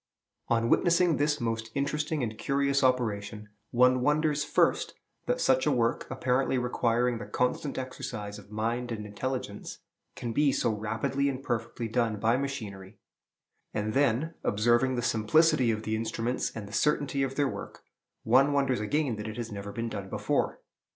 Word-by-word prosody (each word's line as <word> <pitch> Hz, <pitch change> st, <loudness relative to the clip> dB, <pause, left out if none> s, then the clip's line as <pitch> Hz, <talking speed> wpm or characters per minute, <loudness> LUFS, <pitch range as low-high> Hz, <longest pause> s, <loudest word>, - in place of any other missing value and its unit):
On 115 Hz, 0 st, +2 dB
witnessing 170 Hz, +3 st, +3 dB
this 150 Hz, +1 st, +1 dB
most 115 Hz, -1 st, -2 dB
interesting 150 Hz, +1 st, -1 dB
and 110 Hz, -2 st, -3 dB
curious 140 Hz, +2 st, +1 dB
operation, 105 Hz, -4 st, 0 dB, 0.2 s
one 125 Hz, +1 st, +4 dB
wonders, 150 Hz, +2 st, +2 dB
first, 150 Hz, -, +1 dB, 0.3 s
that -, -, +1 dB
such 130 Hz, +1 st, +3 dB
a -, -, +4 dB
work, 115 Hz, -3 st, +1 dB
apparently 130 Hz, 0 st, +1 dB
requiring 125 Hz, -1 st, +1 dB
the -, -, -7 dB
constant 125 Hz, +3 st, -1 dB
exercise 105 Hz, -5 st, -5 dB
of 100 Hz, -, -16 dB
mind 115 Hz, +3 st, -2 dB
and 105 Hz, -2 st, -4 dB
intelligence, 105 Hz, 0 st, -4 dB, 0.4 s
can 120 Hz, -1 st, -4 dB
be 145 Hz, +2 st, +3 dB
so 120 Hz, -, +1 dB
rapidly 110 Hz, +6 st, -1 dB
and 135 Hz, 0 st, -5 dB
perfectly 115 Hz, -1 st, -3 dB
done 115 Hz, -2 st, 0 dB
by 115 Hz, +3 st, +3 dB
machinery; 110 Hz, -8 st, -5 dB, 0.8 s
and 105 Hz, +1 st, -1 dB
then, 140 Hz, +3 st, +2 dB
observing 120 Hz, +5 st, +2 dB
the 120 Hz, -, -2 dB
simplicity 125 Hz, +4 st, +3 dB
of 110 Hz, -1 st, -1 dB
the 110 Hz, 0 st, -1 dB
instruments 115 Hz, +2 st, -2 dB
and 110 Hz, -3 st, -6 dB
the 100 Hz, -, -11 dB
certainty 145 Hz, -1 st, +1 dB
of 135 Hz, 0 st, -1 dB
their 145 Hz, -1 st, +2 dB
work, -, -, -7 dB, 0.4 s
one 135 Hz, +5 st, +4 dB
wonders 135 Hz, -3 st, +2 dB
again 125 Hz, +2 st, 0 dB
that 105 Hz, +1 st, -5 dB
it 110 Hz, -, -6 dB
has 120 Hz, -1 st, -4 dB
never 100 Hz, 0 st, -6 dB
been 115 Hz, +3 st, -3 dB
done 100 Hz, -3 st, -6 dB
before. -, -, -1 dB
120 Hz, 165 wpm, -29 LUFS, 110-135 Hz, 0.8 s, one